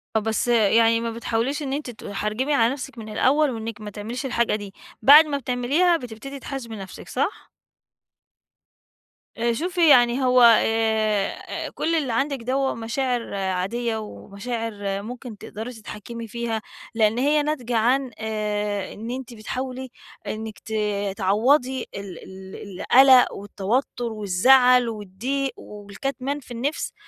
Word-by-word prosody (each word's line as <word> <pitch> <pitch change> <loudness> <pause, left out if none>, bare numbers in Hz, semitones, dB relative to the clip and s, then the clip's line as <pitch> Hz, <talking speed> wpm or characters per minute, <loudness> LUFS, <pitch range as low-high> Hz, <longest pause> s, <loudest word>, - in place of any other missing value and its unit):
آه، - - +5
بس 220 +2 -1
يعني 230 0 +4
ما 230 0 -2
بتحاوليش 235 +5 -2
إن 270 -1 -3
أنتِ 290 -2 -3
تحرجِمي 215 +4 -3
على 235 -2 +3
نفسِك 275 -1 -8
من 220 -1 -8
الأول 280 +7 +3
وإنِّك 225 -2 -6
ما 210 - -6
تعمليش 220 +6 -6
الحاجة 235 -4 +1
دي، 205 -2 -7 0.3
بعد 290 +7 +9
ما 285 -2 -2
بتعمليها 280 +8 +2
بتبتدي 255 +1 -8
تحاسبي 255 -4 -6
نفسِك، 195 -3 -9
صح؟ - - -3 1.9
آآ 235 +1 +1
شوفي 345 +4 +2
يعني 245 -1 +5
هو 255 0 +4 0.2
آآ 220 -2 0
كل 330 - -1
اللي 280 -7 0
عندِك 275 +3 0
دَوَّة 265 +2 0
مشاعر 240 +1 -2
عادية، 195 +5 -1
ومشاعر 210 -1 -5
ممكن 240 0 -8
تقدري 225 +6 -7
تتحكمي 225 +1 -8
فيها، 225 0 -3 0.3
لأن 220 0 +3
هي 295 +3 +3
ناتجة 250 -6 -2
عن 250 +3 +2
آآ 210 -2 -2
إن 225 +3 -6
أنتِ 255 -1 -6
بتحاولي 255 +3 -5 0.4
إنِّك 220 0 -5
ت 220 - -9 0.4
تعوّضي 250 +7 +2
ال 195 -3 -8
ال 190 0 -10
القلق 260 -1 +7
والتوتر 210 +6 -2
والزعل 245 +5 +4
والضيق 230 +7 -3
والكتمان 255 +7 -5
في 260 - -16
النفس 265 +6 -3
235 Hz, 135 wpm, -23 LUFS, 215-265 Hz, 1.9 s, بعد